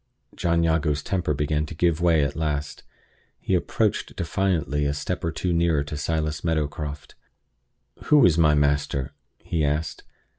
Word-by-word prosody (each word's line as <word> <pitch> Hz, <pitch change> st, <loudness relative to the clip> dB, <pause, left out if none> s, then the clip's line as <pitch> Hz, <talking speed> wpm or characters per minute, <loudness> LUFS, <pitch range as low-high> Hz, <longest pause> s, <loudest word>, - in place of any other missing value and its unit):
John 85 Hz, -1 st, +1 dB
Jago's 80 Hz, -3 st, +1 dB
temper 90 Hz, -5 st, -1 dB
began 75 Hz, +1 st, -1 dB
to 80 Hz, -, -8 dB
give 85 Hz, 0 st, +1 dB
way 85 Hz, -3 st, +4 dB
at 70 Hz, 0 st, -2 dB
last. 75 Hz, -2 st, -3 dB, 0.6 s
He -, -, -2 dB
approached -, -, 0 dB
defiantly 85 Hz, -5 st, 0 dB
a 70 Hz, -, -1 dB
step 90 Hz, +4 st, -4 dB
or 85 Hz, -, 0 dB
two 85 Hz, +2 st, -2 dB
nearer 85 Hz, -3 st, +2 dB
to 75 Hz, +1 st, -6 dB
Silas 75 Hz, +1 st, -2 dB
Meadowcroft. 75 Hz, -2 st, -3 dB, 0.9 s
"Who 150 Hz, -3 st, +6 dB
is 85 Hz, -4 st, +4 dB
my 75 Hz, -2 st, +4 dB
master?" 70 Hz, -1 st, 0 dB, 0.3 s
he 80 Hz, -2 st, -1 dB
asked. 75 Hz, 0 st, -2 dB
75 Hz, 150 wpm, -24 LUFS, 75-85 Hz, 0.9 s, Who